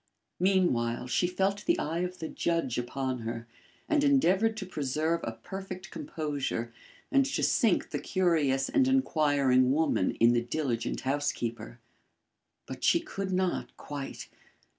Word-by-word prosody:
Meanwhile, 175 -12 +2
she 175 - +2
felt 195 +3 0
the 340 - +3
eye 160 +3 -2
of 180 +1 -3
the 160 - -5
judge 165 -10 -1
upon 130 +1 -3
her 115 0 -5 0.4
and 305 -3 +2
endeavoured 225 -6 +3
to 200 - -4
preserve 155 0 -1
a - - -2
perfect 190 -2 -8
composure 140 -7 -3 0.4
and 275 -1 +5
to 275 - -1
sink 225 -7 +2
the - - -2
curious 155 -8 +1
and 270 -2 +3
inquiring 145 - +3
woman 150 -10 +1
in 115 +1 +5
the 120 - +2
diligent 120 -1 -2
housekeeper. 125 - -2 0.9
But - - -8
she - - +5
could 195 -1 -5
not, 185 -1 -1
quite. 145 -2 -6
160 Hz, 140 wpm, -29 LUFS, 130-190 Hz, 0.9 s, and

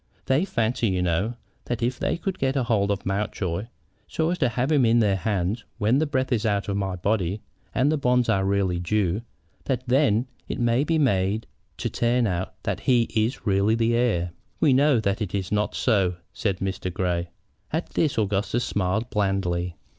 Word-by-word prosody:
"They 135 +7 +2
fancy, 115 - 0
you 90 -2 0
know, 90 +7 0 0.3
that 120 -1 -2
if 120 +1 -1
they - - 0
could 190 +2 -4
get 135 0 +1
a 135 - +2
hold 105 -4 +1
of 100 -1 -2
Mountjoy, 95 -1 -2 0.4
so 160 +1 0
as 180 - -2
to 130 -6 +3
have 125 +5 -1
him 145 -4 +4
in 115 0 +4
their 105 -4 +3
hands 100 +2 -1
when 110 +6 +2
the 155 - +1
breath 130 -1 -1
is 115 -3 +1
out 100 -3 0
of 100 - -1
my 95 -2 -1
body 100 +1 -1 0.3
and 140 +4 +3
the 155 - 0
bonds 125 -2 +2
are 95 - +2
really 95 -2 +1
due, 95 +2 0 0.4
that 130 -2 -1
then 125 -3 +3 0.2
it - - -4
may 120 +2 +2
be 160 +2 +1
made 105 -6 +1 0.3
to - - -2
turn 120 +1 +1
out 95 -2 -2
that - - -2
he 125 -2 +3
is 115 +4 0
really 100 +2 +3
the 115 0 +2
heir." 105 -8 +1 0.3
"We 145 -4 +4
know 140 -1 +4
that 100 0 -1
it 100 -2 -2
is 95 -2 -3
not 105 0 0
so," 95 -7 +2 0.2
said 100 -3 -1
Mr. 95 -1 -2
Grey. 90 -1 -1 0.4
At - - -2
this 150 -6 +1
Augustus 105 +3 0
smiled 100 +4 -1
blandly. 95 -4 0
110 Hz, 195 wpm, -25 LUFS, 95-125 Hz, 0.4 s, him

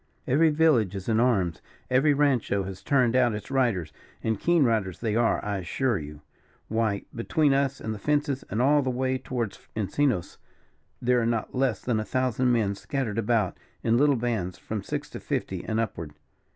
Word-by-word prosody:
Every 155 +5 +4
village 150 - +3
is 95 -1 -6
in 110 -1 +2
arms, 100 -10 +1 0.3
every 135 +4 +4
rancho 130 -8 +2
has 95 0 -7
turned 130 -5 +2
out 120 -4 +3
its 105 - -7
riders; 110 - 0 0.3
and 110 -2 0
keen 170 -3 +3
riders 110 -7 0
they 110 -2 -2
are, 115 0 +2
I 100 -2 -1
assure 115 +5 -1
you. 75 0 -9 0.5
Why, 110 -2 0
between 145 +5 +1
us 140 0 +1
and 110 - -4
the 105 - -7
fences, 145 +2 0
and 110 +5 0
all 145 +2 +4
the 130 - -1
way 130 +1 -1
towards 120 -6 -4 0.2
Encinos, 110 -1 -1 0.6
there 125 0 +3
are 115 - 0
not 115 -2 -1
less 130 0 0
than 120 -3 0
a - - -1
thousand 130 +1 +1
men 110 -4 +2
scattered 115 0 -3
about 110 -4 0 0.2
in 115 0 +3
little 145 0 +4
bands, 110 -7 -2
from 110 -2 -5
six - - -4
to - - -6
fifty - - -3
and 110 0 -1
upward. 80 -9 -3
115 Hz, 185 wpm, -26 LUFS, 105-130 Hz, 0.6 s, Every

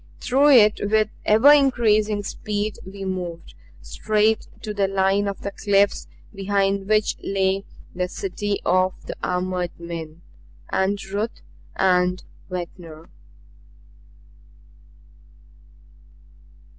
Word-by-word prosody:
Through 275 +4 +3
it 210 -4 +6
with 215 0 +2 0.2
ever 220 +7 +6
increasing 215 -7 +2
speed 210 +1 -4
we 195 +1 -8
moved, 180 -3 -5 0.3
straight 215 - 0 0.2
to 215 -2 -4
the 200 -1 +1
line 195 +1 +1
of 200 - -5
the 200 - -4
cliffs 200 0 +1 0.3
behind 195 0 0
which 215 0 +2
lay 195 0 0 0.3
the 180 0 -2
city 200 +2 -3
of 185 +1 +2
the - - -6
armored 180 -1 -2
men 170 -1 -8 0.5
and 190 +2 +1
Ruth 205 +4 -4 0.3
and 180 -1 +2 0.3
Ventnor. 170 -3 -8
195 Hz, 100 wpm, -23 LUFS, 185-210 Hz, 0.5 s, it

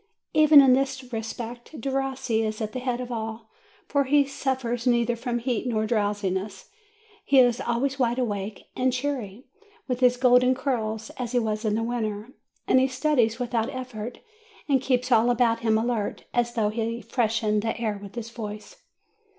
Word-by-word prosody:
Even 305 -2 +8
in 265 -2 +6
this 260 -1 -1
respect, 235 +5 -6
Derossi 265 -2 -1
is 215 -1 -3
at 215 -2 -3
the 255 - -4
head 250 -1 -2
of 250 0 -5
all, 225 -1 -5 0.4
for 280 -1 +1
he 285 +2 +4
surfers 260 -3 -2
neither 240 -1 +2
from 240 +1 -3
heat 240 0 -2
nor 220 -3 0
drowsiness; 205 - -2 0.5
he 275 - +3
is 245 -1 +5
always 265 +3 -1
wide 240 -1 +1
awake, 205 -4 -4
and 255 0 +1
cneery, 250 -5 -3 0.4
with 250 -2 -2
his 250 -1 +4
golden 250 0 +5
curls, 225 -5 -2
as 245 -1 -3
he 245 - +3
was 215 -1 -2
in 210 -1 +1
the 225 - 0
winter, 220 -2 -3 0.4
and 260 - +5
he 260 - +3
studies 255 -4 +1
without 235 -2 -1
effort, 250 -3 -6 0.5
and 270 -3 +3
keeps 255 -1 0
all 230 0 +5
about 240 -1 +2
him 220 -1 +2
alert, 225 -2 -2
as 240 0 0
though 215 -3 +2
he 230 +1 -2
freshened 220 -3 0
the 225 +1 -3
air 215 -3 -2
with 200 +1 -10
his 230 -1 -6
voice. 215 - -8
240 Hz, 175 wpm, -25 LUFS, 220-255 Hz, 0.5 s, Even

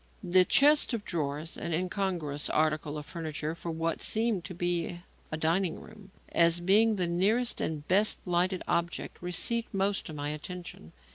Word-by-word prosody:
The 185 0 +5
chest 285 +4 +4
of 210 - -6
drawers 155 -1 -3
an 170 - -3
incongruous 180 -5 -1
article 155 -1 0
of 150 - -7
furniture 155 -1 -4
for 170 +1 -7
what 165 0 -2
seemed 220 -4 +1
to 180 - -7
be 175 0 -1 0.3
a 155 - -2
dining 165 +2 0
room 205 -2 -14 0.2
as 170 0 +4
being 210 +5 +4
the 185 -3 +1
nearest 205 +8 +1
and 150 -2 -3
best 205 +4 +2
lighted 180 +1 +1
object 170 0 -2
received 210 +6 -1
most 195 -1 0
of 155 - -7
my 145 0 -2
attention. 150 - -8
175 Hz, 160 wpm, -29 LUFS, 160-195 Hz, 0.3 s, The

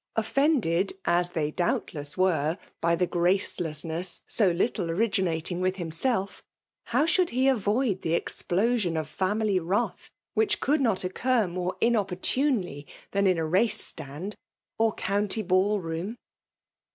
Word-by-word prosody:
Offisnded, 225 - +2
as 175 +1 +3
they 150 -2 -1
doubtless 150 -3 -2
were, 170 -3 +2 0.2
by 170 0 +3
the. 180 - +1
gracelessness 175 -1 -1
so 205 -5 +3
little 180 +1 0
originating 180 -3 0
with 185 0 +1
himself, 190 +4 -2 0.4
how 295 - +2
should 350 +2 +2
he 255 +2 +1
avoid 220 -4 +1
the 165 0 0
explosion 190 0 0
of 155 -2 -2
family 195 +4 0
wrath, 190 +7 -2 0.2
which 440 -1 +2
could 290 +2 +1
not 225 -8 +1
occur 235 +5 +1
more 180 +1 -3
inopportunely 205 - 0 0.2
dian 200 0 +2
in 185 -2 +3
a 165 - 0
race 190 +7 +2
stand, 150 +9 -5 0.5
or 225 0 +4
county 205 +2 0
ball 190 +3 +2
room? 170 +5 -4
185 Hz, 130 wpm, -27 LUFS, 170-225 Hz, 0.5 s, or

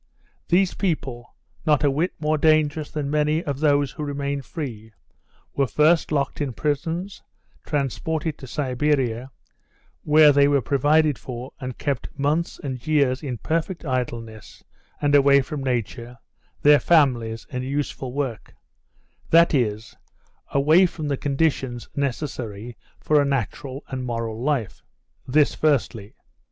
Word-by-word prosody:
These 180 +1 +3
people, 135 -10 -3 0.3
not 150 -1 +2
a 145 - +4
wit 160 +6 -1
more 155 0 0
dangerous 155 -1 +2
than 145 -2 -3
many 150 +2 +1
of 140 -2 -3
those 145 -2 +2
who 150 - -6
remained 140 -1 -3
free, 110 -9 -7 0.6
were 140 -1 +2
first 155 +9 +3
locked 140 0 -1
in 140 -4 -2
prisons, 165 - -3 0.5
transported 150 +2 -2
to 130 - -9
Siberia, 130 -2 -1 0.7
where 150 0 +6
they 140 0 +4
were 145 -1 +3
provided 145 +2 +2
for 125 +1 -7
and 130 -3 -6
kept 140 -1 -3
months 150 +4 0
and 130 0 -6
years 140 -4 +2
in 130 -5 -4
perfect 165 - -2
idleness, 115 -5 -5 0.4
and 145 0 +1
away 140 -1 +6
from 140 0 -4
nature, 120 -1 -3 0.5
their 145 0 +7
families, 120 -8 +2
and 125 0 -3
useful 135 -1 -3
work 130 -5 -4 0.7
that 170 0 +5
is, 110 -5 -1 0.5
away 155 +7 +4
from 155 -3 -6
the 140 - +1
conditions 135 -4 -1
necessary 120 -5 -4 0.2
for 150 -1 +3
a - - +2
natural 135 +1 -3
and 130 -1 -4
moral 115 -2 -4
life. 130 -7 -1 0.5
This 145 +3 +3
firstly. 125 -8 0
140 Hz, 135 wpm, -23 LUFS, 125-150 Hz, 0.7 s, their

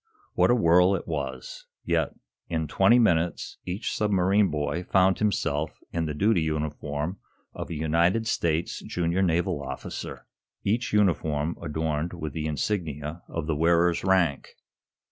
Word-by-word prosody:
What - - +3
a 120 - +5
whirl 90 -2 +5
it 95 - -5
was. 70 -5 -5 0.2
Yet, - - 0 0.3
in 80 -2 -1
twenty 115 +10 +4
minutes, 85 -8 +1
each 90 +3 -3
submarine 100 -1 +3
boy 75 +3 -2
found 95 0 +3
himself 80 -8 0 0.2
in 85 -1 0
the 75 - -3
duty 100 +1 +3
uniform 75 +2 -3 0.3
of - - -6
a 85 - -4
United 85 +8 +2
States 85 -6 0
junior 85 +1 -1
naval 85 -4 +1
officer, 65 -1 -6 0.4
each 115 +4 0
uniform 85 -6 +1
adorned 80 +1 -2
with 80 -4 -5
the 80 0 -3
insignia 75 -1 -3
of 85 -2 -4
the 80 -1 -1
wearer's 85 +2 +3
rank. 90 -7 +1
85 Hz, 140 wpm, -26 LUFS, 75-95 Hz, 0.4 s, a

